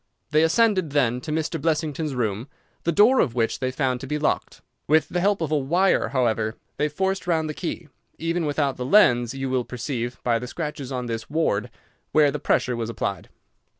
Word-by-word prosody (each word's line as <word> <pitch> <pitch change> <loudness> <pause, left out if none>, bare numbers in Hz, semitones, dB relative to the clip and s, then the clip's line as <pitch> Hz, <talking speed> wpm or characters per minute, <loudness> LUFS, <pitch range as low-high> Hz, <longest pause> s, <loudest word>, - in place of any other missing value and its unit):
They 155 +1 +4
ascended, 185 -2 +2
then, 125 -4 +2
to 155 - -5
Mr. 160 0 -2
Blessington's 155 -2 -1
room, 110 0 -2 0.4
the 170 - +2
door 215 +10 +5
of 125 -7 +1
which 115 -2 0
they 130 - -1
found 130 -1 -1
to - - -6
be 150 - -1
locked. 150 0 -2 0.2
With 155 +2 +3
the 180 - -1
help 200 0 +1
of 155 -2 -2
a 155 - +3
wire, 175 +3 +2
however, 115 -4 0 0.2
they 150 - +1
forced 190 +5 -2
round 160 -2 +1
the 155 - -3
key. 170 0 -5 0.3
Even 165 0 -1
without 145 -2 0
the 125 - -3
lens 125 - +4
you 135 0 -3
will 130 -1 0
perceive, 120 0 -4
by 120 -2 +2
the 125 - -6
scratches 150 -2 -5
on 125 -1 -3
this 115 -1 -5
ward, 145 -10 0 0.4
where 150 -2 +5
the 150 - -4
pressure 125 -2 +1
was 115 -1 -3
applied. 100 -4 -4
145 Hz, 200 wpm, -24 LUFS, 125-160 Hz, 0.4 s, door